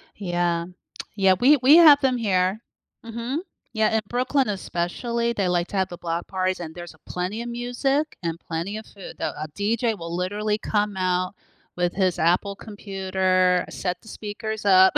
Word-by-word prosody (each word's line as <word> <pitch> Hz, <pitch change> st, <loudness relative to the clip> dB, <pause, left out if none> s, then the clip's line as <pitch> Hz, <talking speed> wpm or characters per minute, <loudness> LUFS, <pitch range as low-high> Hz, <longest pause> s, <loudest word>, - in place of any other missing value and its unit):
Yeah, 175 Hz, -3 st, -1 dB, 0.5 s
yeah, 195 Hz, -2 st, +5 dB
we 285 Hz, +4 st, +6 dB
we 280 Hz, +5 st, +8 dB
have 305 Hz, -4 st, +9 dB
them 255 Hz, -2 st, +2 dB
here, 190 Hz, -2 st, +1 dB, 0.5 s
mhm, 235 Hz, +6 st, -3 dB, 0.3 s
yeah, 220 Hz, 0 st, +2 dB
in 220 Hz, -, 0 dB
Brooklyn, 255 Hz, +3 st, +1 dB
especially, 235 Hz, +5 st, -2 dB
they 200 Hz, -5 st, 0 dB
like 175 Hz, 0 st, +1 dB
to 200 Hz, -, -3 dB
have 190 Hz, -1 st, +1 dB
the 175 Hz, -, -8 dB
block 170 Hz, 0 st, -3 dB
parties, 185 Hz, -1 st, -1 dB
and 160 Hz, -2 st, -7 dB
there's 175 Hz, -1 st, -8 dB
a 160 Hz, -, -23 dB
plenty 185 Hz, +5 st, -3 dB
of 240 Hz, -, -5 dB
music, 245 Hz, +5 st, -1 dB
and 165 Hz, -1 st, -3 dB
plenty 170 Hz, +6 st, -4 dB
of 220 Hz, -, -8 dB
food 195 Hz, -, -11 dB
though, -, -, -2 dB
a 155 Hz, -, -4 dB
DJ 220 Hz, +2 st, 0 dB
will 170 Hz, -1 st, -5 dB
literally 210 Hz, +4 st, -1 dB
come 210 Hz, -2 st, -1 dB
out 185 Hz, 0 st, 0 dB, 0.4 s
with 175 Hz, 0 st, 0 dB
his 185 Hz, -3 st, +1 dB
Apple 180 Hz, +5 st, +2 dB
computer, 190 Hz, -3 st, 0 dB
set 180 Hz, -1 st, -3 dB
the -, -, -19 dB
speakers 215 Hz, 0 st, -5 dB
up, 190 Hz, -1 st, +7 dB
195 Hz, 175 wpm, -24 LUFS, 180-225 Hz, 0.5 s, have